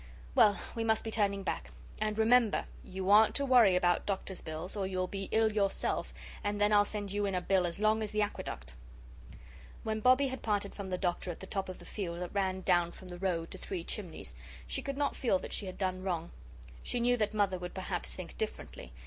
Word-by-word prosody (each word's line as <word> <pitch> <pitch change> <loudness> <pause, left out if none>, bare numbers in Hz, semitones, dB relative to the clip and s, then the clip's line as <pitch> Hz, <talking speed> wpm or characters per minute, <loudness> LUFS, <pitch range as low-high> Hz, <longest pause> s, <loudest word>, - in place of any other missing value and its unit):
Well, 205 -1 +6 0.2
we 230 - -2
must 220 -1 +2
be 225 - -4
turning 200 -2 +1
back. 60 - -3 0.3
And, 215 0 -1
remember, 225 0 +4 0.2
you 190 +1 -2
aren't 215 +1 +7
to 280 - +2
worry 240 -8 +6
about 175 -1 +2
doctor's 190 -1 -3
bills 160 +5 -5
or 195 -2 -1
you'll 185 -1 -1
be 195 +1 -5
ill 220 0 +3
yourself, 200 -2 0 0.3
and 205 0 -1
then 205 +1 +4
I'll 205 0 +6
send 205 -2 -3
you 205 0 0
in 195 - -1
a - - +2
bill 185 -1 +2
as 170 - -4
long 215 +1 +3
as 215 - -3
the 210 0 +2
aqueduct." - - -5 1.1
When 220 0 -1
Bobbie 255 +4 +5
had 260 - -5
parted 205 -2 -1
from 200 -2 -6
the 180 - -1
Doctor 180 0 -1
at 175 - -5
the - - -7
top 190 0 -3
of 185 - -6
the - - -13
field 175 -5 -4
that 180 - -5
ran 190 -2 0
down 175 -2 +3
from 185 - -12
the 175 0 -7
road 170 -3 -1
to - - -8
Three 180 -3 -4
Chimneys, 180 -2 -5 0.3
she - - -1
could 275 0 -4
not 285 -1 0
feel 230 -7 +2
that - - -7
she 200 - -2
had 185 - -7
done 185 -1 -1
wrong. 175 -3 -2 0.5
She 245 - -2
knew 245 +1 +3
that 215 -1 0
Mother 195 -3 +2
would 180 0 -6
perhaps 185 -1 -2
think 185 -2 -8
differently. 65 - -5
195 Hz, 225 wpm, -32 LUFS, 185-215 Hz, 1.1 s, aren't